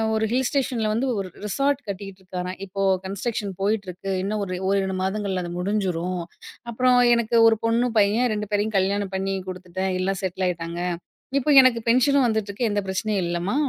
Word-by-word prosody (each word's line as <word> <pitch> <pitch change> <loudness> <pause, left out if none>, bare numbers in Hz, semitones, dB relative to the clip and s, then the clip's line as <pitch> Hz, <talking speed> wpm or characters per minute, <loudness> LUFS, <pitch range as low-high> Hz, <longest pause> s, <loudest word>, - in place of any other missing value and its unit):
ஒரு 220 - +1
ஹில் 255 0 +2
ஸ்டேஷன்ல 250 -6 0
வந்து 240 +5 0
ஒரு 190 - -3 0.2
ரிசார்ட் 275 +6 +1
கட்டிக்கிட்டு 195 -1 -7
இருக்காராம். 180 0 -5
இப்போ 195 +1 -5 0.2
கன்ஸ்ட்ரக்ஷன் 200 0 -3
போயிட்டிருக்கு, 195 -2 -2
இன்னும் 210 +1 -2
ஒரு 185 -1 -4
ஓர் 200 0 +3
இரு 190 0 -2
மாதங்ள்ல 190 -2 -1
அது 175 - -5
முடிஞ்ரும். 180 -3 -1 0.5
அப்புறம், 250 +2 +3 0.2
எனக்கு 235 0 0
ஒரு 225 -1 +4
பொண்ணு, 235 +2 +2
பையன் 220 +4 +3
2 210 0 -4
பேரையும், 210 +1 0
கல்யாணம் 195 +1 0
பண்ணி 195 0 -1
குடுத்துட்டேன். 185 +1 -4
எல்லா 195 +1 0
செட்டில் 185 0 -1
ஆய்ட்டாங்க. 170 0 -4 0.6
இப்ப 295 +2 +2
எனக்கு 250 -3 +4
பென்ஷனும் 265 +3 +4
வந்துட்டுருக்கு. 220 +1 -1
எந்த 205 0 0
பிரச்சனையும் 195 0 -1
இல்லம்மா, 175 +7 -1
200 Hz, 165 wpm, -24 LUFS, 185-230 Hz, 0.6 s, ஒரு